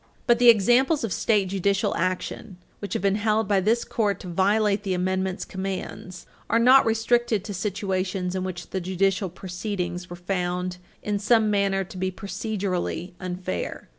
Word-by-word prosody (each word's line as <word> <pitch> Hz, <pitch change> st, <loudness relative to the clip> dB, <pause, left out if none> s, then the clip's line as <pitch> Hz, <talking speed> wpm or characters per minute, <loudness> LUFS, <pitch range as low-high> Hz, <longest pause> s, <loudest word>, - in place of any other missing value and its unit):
But 240 Hz, -1 st, +4 dB
the 245 Hz, -1 st, +7 dB
examples 245 Hz, -, +4 dB
of 215 Hz, -6 st, -1 dB
state 205 Hz, -4 st, +1 dB
judicial 195 Hz, +1 st, 0 dB
action 185 Hz, +2 st, -3 dB, 0.2 s
which 200 Hz, -, -5 dB
have -, -, -2 dB
been 200 Hz, 0 st, +2 dB
held 215 Hz, -1 st, +1 dB
by 200 Hz, -1 st, +3 dB
this 225 Hz, +5 st, +2 dB
Court 205 Hz, -4 st, -1 dB
to -, -, -8 dB
violate 200 Hz, +3 st, +2 dB
the 195 Hz, -3 st, -1 dB
Amendment's 185 Hz, +1 st, -1 dB
commands 190 Hz, -1 st, -6 dB, 0.2 s
are -, -, +3 dB
not 250 Hz, +2 st, +6 dB
restricted 225 Hz, -1 st, +1 dB
to 210 Hz, -, -6 dB
situations 190 Hz, -2 st, -2 dB
in 185 Hz, -1 st, -2 dB
which 180 Hz, -2 st, -6 dB
the 190 Hz, -, -2 dB
judicial 190 Hz, +1 st, 0 dB
proceedings 180 Hz, 0 st, -5 dB
were 175 Hz, -, -6 dB
found 180 Hz, 0 st, -2 dB, 0.3 s
in 205 Hz, -1 st, -1 dB
some 215 Hz, 0 st, +3 dB
manner 195 Hz, -1 st, +1 dB
to 185 Hz, -, -11 dB
be 185 Hz, +1 st, -1 dB
procedurally 195 Hz, -3 st, -3 dB
unfair. 180 Hz, -, -5 dB
195 Hz, 165 wpm, -25 LUFS, 185-215 Hz, 0.3 s, the